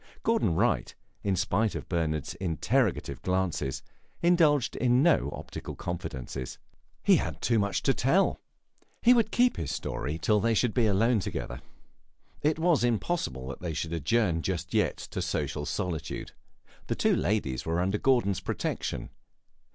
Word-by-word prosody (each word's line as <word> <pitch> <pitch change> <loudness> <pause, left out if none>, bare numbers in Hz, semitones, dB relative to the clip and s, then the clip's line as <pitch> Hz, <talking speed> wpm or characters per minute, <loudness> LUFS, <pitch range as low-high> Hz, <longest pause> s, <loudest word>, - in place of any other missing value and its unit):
Gordon 225 - +2
Wright, - - +1 0.3
in 100 -2 +1
spite 105 +4 +1
of - - -5
Bernard's 80 -4 -1
interrogative 100 - 0
glances, 90 -7 -1 0.4
indulged 160 -7 +4
in 125 +2 +3
no 160 - +3
optical - - -7
confidences. 65 -7 -5 0.5
He - - +6
had - - -3
too 115 -2 +2
much 100 -1 0
to 135 - +3
tell. 150 - +2 0.6
He 245 - +8
would 230 -3 +3
keep 245 +2 +3
his 75 - -3
story 75 +5 -3
till 105 +5 +2
they 115 +2 +2
should 120 0 +2
be 120 -3 +3
alone 110 +3 +3
together. 60 -8 -4 0.8
It 150 +1 +2
was 165 -4 +3
impossible 115 - -1
that 70 - -6
they 85 -3 -3
should 85 +1 -3
adjourn 85 - +1
just 90 -1 -3
yet - - +2
to - - -5
social 75 0 -2
solitude; 85 -1 -3 0.6
the - - -1
two - - +2
ladies 85 -10 0
were 85 +1 -1
under 95 +3 0
Gordon's 120 -8 +2
protection. 95 - -3
100 Hz, 150 wpm, -28 LUFS, 80-130 Hz, 0.8 s, He